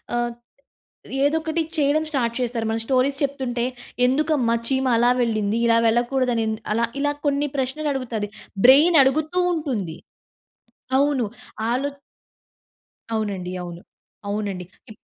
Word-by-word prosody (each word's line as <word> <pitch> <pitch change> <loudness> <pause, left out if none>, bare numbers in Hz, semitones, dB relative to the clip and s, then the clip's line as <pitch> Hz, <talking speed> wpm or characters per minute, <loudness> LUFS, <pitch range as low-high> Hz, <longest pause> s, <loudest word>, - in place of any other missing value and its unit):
ఆహ్, 240 0 0 0.9
ఏదో 295 +3 +3
ఒకటి 320 +1 -1
చేయడం 295 +1 +2
స్టార్ట్ 235 -5 0
చేస్తారు. 235 -2 -1
మన 225 - 0
స్టోరీస్ 270 +1 +2
చెప్తుంటే, 260 -4 -1 0.4
"ఎందుకమ్మా 265 -3 +2
చీమ 265 +1 +1
అలా 240 +1 +4
వెళ్ళింది. 215 -3 0
ఇలా 230 0 +4
వెళ్ళకూడదనిది." 235 -2 +1
అలా 230 +2 +1 0.2
ఇలా 290 0 +1
కొన్ని 285 +1 +2
ప్రశ్నలడుగుతాది. 265 -5 -2 0.4
బ్రైన్ 300 +6 +7
అడుగుతూ 310 +6 +1 0.2
ఉంటుంది. 235 - -3 1.0
అవును. 280 -4 +2 0.4
ఆలో 265 +4 0 1.3
అవునండి. 200 -5 -2
అవును. 175 0 -8 0.5
అవునండి. 200 -3 -3 0.3
ఇప్ 215 - -11
250 Hz, 110 wpm, -23 LUFS, 225-280 Hz, 1.3 s, బ్రైన్